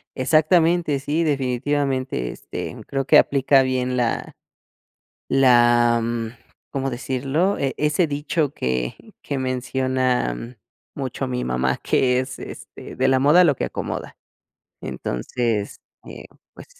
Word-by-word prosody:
Exactamente, 160 +2 +3
sí, 150 +4 -1
definitivamente, 135 - -1
este, - - -7
creo 135 -1 -2
que - - +6
aplica 135 0 +4
bien 130 -1 -1
la 120 -2 -1 0.9
la 120 -2 +4
mm, 115 0 -2 0.4
¿cómo 135 0 -2
decirlo? 135 +9 -1
E 140 - 0
e 150 - 0
ese 150 +4 +2
dicho 145 0 -1
que 65 -1 -2 0.3
que 140 - -3
menciona 130 - -1 0.4
mucho 135 -1 -4
mi 125 -1 -3
mamá, 65 +1 0
que 125 -1 +2
es, 130 -1 -6
este,: - - -10
"De 130 +1 +2
la 130 0 +4
moda 150 +7 +6
lo 145 -6 +3
que - - -2
acomoda". - - -5 0.6
Entonces, 105 - -3 0.3
eh, - - -10 0.3
pues, - - -12
130 Hz, 125 wpm, -22 LUFS, 120-145 Hz, 0.9 s, que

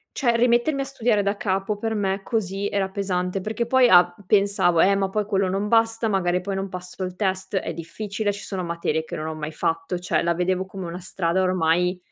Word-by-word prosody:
cioè 240 -4 +2
rimettermi 240 +4 +2
a - - 0
studiare 235 -6 0
da 200 +1 0
capo 195 +1 -1
per 225 +2 -2
me 195 -1 -1
così 200 -2 -2
era 195 -1 -1
pesante 190 -1 -2
perché 215 +4 -2
poi 255 +1 +5
a 175 -2 +6
pensavo: 195 -4 +3
"Eh 200 - +5
ma 195 -1 0
poi 210 +1 -1
quello 195 -2 +1
non 195 +3 -1
basta, 225 0 +2
magari 180 -2 +1
poi 195 +1 -3
non 195 0 -2
passo, 180 0 -7
il 180 0 -6
test 190 0 -2
è 185 - -1
difficile, 205 +5 -3
ci 200 - -8
sono 190 -2 -4
materie 170 -2 -2
che - - -6
non 155 - -4
ho 160 - -4
mai 155 0 -5
fatto." 165 +3 -1
Cioè 180 - 0
la 170 0 +1
vedevo 185 +2 0
come 190 -1 -7
una 170 +2 -6
strada 180 0 -1
ormai 180 0 +2
190 Hz, 220 wpm, -23 LUFS, 180-210 Hz, -, a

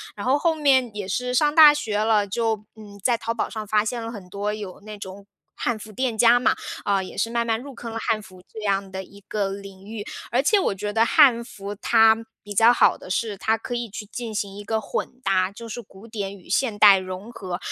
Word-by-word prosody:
然 205 - -6
后 260 +3 +3
后 330 +1 +2
面 270 -5 +3
也 205 -2 -4
是 250 +6 -2
上 295 +3 +3
大 310 -2 +10
学 225 -8 -2
了， 215 -1 +3
就， 220 0 -1
嗯， 205 -2 -13
在 240 +1 +3
淘 230 - -2
宝 230 - -1
上 215 -1 -5
发 210 +1 +2
现 235 +2 -3
了 225 - -5
很 200 -5 -9
多 200 +2 -2
有 205 -4 -7
那 210 0 -9
种 195 0 -10 0.3
汉 240 -2 -1
服 215 0 -10
店 240 +1 -2
家 240 +1 +6
嘛， 245 - +2 0.3
啊， 200 -1 +1
也 185 - -9
是 230 - 0
慢 235 0 0
慢 225 -1 0
入 280 +1 -9
坑 230 0 -7
了 225 - -4
汉 220 -1 0
服 185 -2 -15
这 220 - -8
样 195 -2 -1
的 190 0 -5
一 200 +2 -16
个 205 -2 -1
领 195 -1 -9
域。 215 -1 -6 0.3
而 245 +3 +3
且 405 +9 +3
我 370 - 0
觉 205 +2 -4
得 225 +2 +3
汉 255 -5 +5
服 205 -3 -8
它 225 +1 +4 0.2
比 205 - -8
较 225 +4 +6
好 - - +4
的 - - -12
是 205 +2 -1
它 220 +3 +1
可 225 - -6
以 240 0 -3
去 210 +1 -7
进 225 +1 -6
行 200 -1 -3
一 205 - -7
个 220 +1 -1
混 250 +3 -5
搭， 185 -3 +2
就 230 +3 -10
是 240 - -5
古 195 -1 -16
典 200 -3 -5
与 180 - -18
现 215 +2 0
代 205 -2 +8
融 185 +4 -7
合。 185 -6 -5
215 Hz, 265 characters per minute, -23 LUFS, 200-235 Hz, 0.3 s, 大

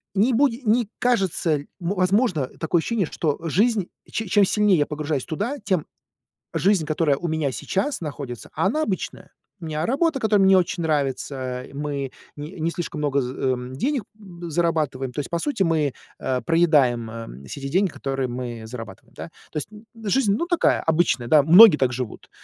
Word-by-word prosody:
не 220 +6 +3
буде 245 -1 +2
не 225 +2 +3
кажется, 190 -9 +1
ль 145 - -10
ну, 175 +3 -2
возможно, 185 - +2
такое 165 +1 +1
ощущение, 210 +1 0
что 150 -1 -2
жизнь, 205 +2 +1 0.2
че 225 - -3
чем 205 +2 +4
сильнее 210 -1 +3
я 145 - +3
погружаюсь 150 -2 -3
туда, 230 - -3
тем 190 -6 -1 0.7
жизнь, 190 -5 +2
которая 155 -3 +1
у 175 - -4
меня 155 -4 -1
сейчас 200 - -2
находится, 140 -6 -6
а - - +1
она 305 +9 0
обычная. 195 -9 -4 0.3
У 170 - -8
меня 155 +1 -2
работа, 290 +3 +1
которая 215 -4 +3
мне 190 - +5
не 190 - +7
очень 175 -1 +1
нравится. 135 -4 -2
И 135 - -13
мы 140 -2 -3 0.2
не 150 +5 -8
не 160 +1 0
слишком 170 -3 -5
много 140 -2 +1
з 125 0 -4
э, 130 -1 0
м, 125 +1 -6
б - - -7
денег 270 - 0
зарабатываем. 170 - -2
То 145 - -5
есть 145 - -4
по 170 - 0
сути, 230 -2 0
мы, 155 -5 +1 0.3
э, 130 -1 -1
проедаем, 145 -9 +3
м, 110 - -9
все 140 - -7
те 135 - -4
деньги, 190 +6 +2
которые 135 -3 -3
мы 120 -2 -5
зарабатываем, 115 -5 -10
да. - - -6 0.3
То - - -5
есть, 150 - -3
н 215 +1 -14 0.2
жизнь, 210 -3 +3
ну, - - -1
такая, 345 -1 +2
да, - - -7
обычная, 155 -7 +1
многие 180 +2 +9
так 130 -3 +1
живут, 125 -2 -6
160 Hz, 195 wpm, -23 LUFS, 135-200 Hz, 0.7 s, многие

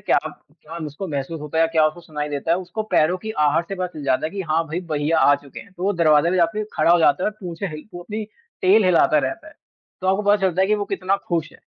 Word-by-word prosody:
क्या-क्या 165 - -3
उसको 150 +7 -6
महसूस 145 +2 -4
होता 150 +2 -4
है - - +5
या - - +4
क्या 160 -1 +4
उसको 155 +3 -4
सुनाई 150 -3 -5
देता 145 +2 -3
है? 170 - +4
उसको 185 +4 -5
पैरों 180 -4 +2
की 220 +3 -6 0.2
आहट 165 +3 +1
से 195 - -3
पता 185 -1 -2
चल - - -6
जाता 130 +3 +1
है 160 - -6
कि 200 - -5
हाँ 165 +2 +2
भई, 170 +4 -3
भाईया 160 -1 0
आ 145 - +5
चुके 140 -1 -9
हैं। 200 - -16
तो 180 - -10
वो 200 +1 +2
दरवाज़े 165 -1 +3
पे 185 - +1
जाके 175 +5 +1
खड़ा 155 +2 +3
हो 175 - +5
जाता 155 +1 +3
है - - +1
और 215 - -20
पूछें 180 +1 -5
हैं 155 - -6
ही 155 - -12
वो 175 - -6
अपनी 215 +3 -5 0.4
टेल 195 +3 +5
हिलाता 165 -4 +4
रहता 135 -2 -3
है, - - -17 0.5
तो 185 - -3
आपको 195 +2 +2
पता 205 +1 +4
चलता 190 -1 +1
है - - +3
कि 215 - +4
वो 205 -1 -2
कितना 195 0 -1
खुश 165 -3 -1
है - - -17
170 Hz, 285 wpm, -22 LUFS, 155-190 Hz, 0.5 s, है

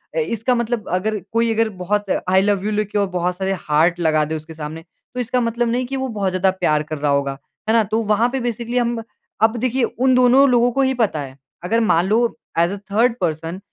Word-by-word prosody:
अ, - - +1
इसका 245 - 0
मतलब 235 -2 -2
अगर 205 +4 -1
कोई 230 0 +1
अगर 225 0 +1
बहुत 205 +1 -1 0.2
आई 190 +1 +5
लव 200 -1 0
यू 215 - 0
लिखे 210 0 -1
और 200 - +1
बहुत 180 +1 -1
सारे 190 0 -1 0.2
हार्ट 165 +4 +3
लगा 155 -2 +2
दे 160 +1 -3
उसके 155 +1 -8
सामने 155 +1 -7 0.3
तो 250 - -5
इसका 250 +1 0
मतलब 235 +1 0
नहीं 250 +1 0
कि 270 - -4
वो 265 0 -2
बहुत 205 -5 -1
ज़्यादा 185 +1 +2
प्यार 155 -5 0
कर 155 - -3
रहा 145 0 0
होगा, 140 -1 0 0.3
है - - +4
ना? 225 -1 +4
तो 220 +3 -1
वहाँ 215 +3 +2
पे 265 +2 -2
बेसिकली 240 0 -3
हम 235 -1 0 0.4
अब 225 +2 +4
देखिए 255 +1 0
उन 255 +3 +1
दोनों 255 +2 +5
लोगों 245 0 +3
को 275 +2 +1
ये 265 0 +2
पता 220 - 0
है। 135 -1 -9 0.3
अगर 225 +6 +1
मान 185 -6 +2
लो 230 +3 +1 0.2
ऐज़ 170 +2 +3
अ, - - -5
थर्ड 230 +3 +3
पर्सन, 165 +2 -2
215 Hz, 235 wpm, -20 LUFS, 175-240 Hz, 0.4 s, आई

